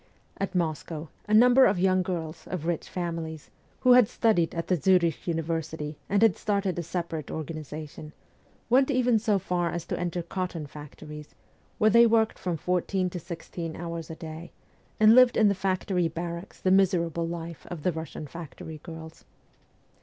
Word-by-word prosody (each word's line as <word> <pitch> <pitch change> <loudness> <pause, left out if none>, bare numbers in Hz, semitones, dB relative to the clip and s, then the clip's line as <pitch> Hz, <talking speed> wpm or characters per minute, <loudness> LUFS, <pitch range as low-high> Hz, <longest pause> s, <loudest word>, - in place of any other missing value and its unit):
At 195 -1 -3
Moscow, 160 -2 -2 0.2
a 210 - -1
number 250 +3 +7
of 195 - +1
young 185 +1 +3
girls, 165 -3 -5
of 175 -4 -4
rich 170 -1 -2
families, 165 -3 -5 0.3
who 250 -1 +6
had 245 -4 +7
studied 210 -10 +1
at 165 - -2
the 185 - +2
Zurich 175 -1 +2
university 160 -2 -3
and 200 +2 +3
had 225 -5 +4
started 200 -4 -1
a - - 0
separate 170 -3 -4
organization, 155 -1 -7 0.6
went 260 +3 +4
even 250 -4 +3
so 210 -2 +2
far 180 -2 -1
as 170 0 -4
to - - -3
enter 175 0 -2
cotton 175 -2 -4
factories, 150 +1 -11 0.4
where 215 0 +4
they 235 +2 +7
worked 220 -1 +2
from 175 -3 -2
fourteen 180 +2 -1
to 180 - -5
sixteen 165 -1 -6
hours 170 -1 -6
a 160 - -6
day, 160 +1 -8 0.5
and 215 +1 +7
lived 255 0 +6
in 215 -2 +5
the - - +3
factory 185 -2 0
barracks 170 +2 -6
the 185 - +1
miserable 170 -3 +2
life 170 -2 -7
of 165 -4 -7
the 180 - +2
"Russian 160 -1 -6
factory 160 0 -9
girls. 160 -1 -10
170 Hz, 170 wpm, -27 LUFS, 160-195 Hz, 0.6 s, number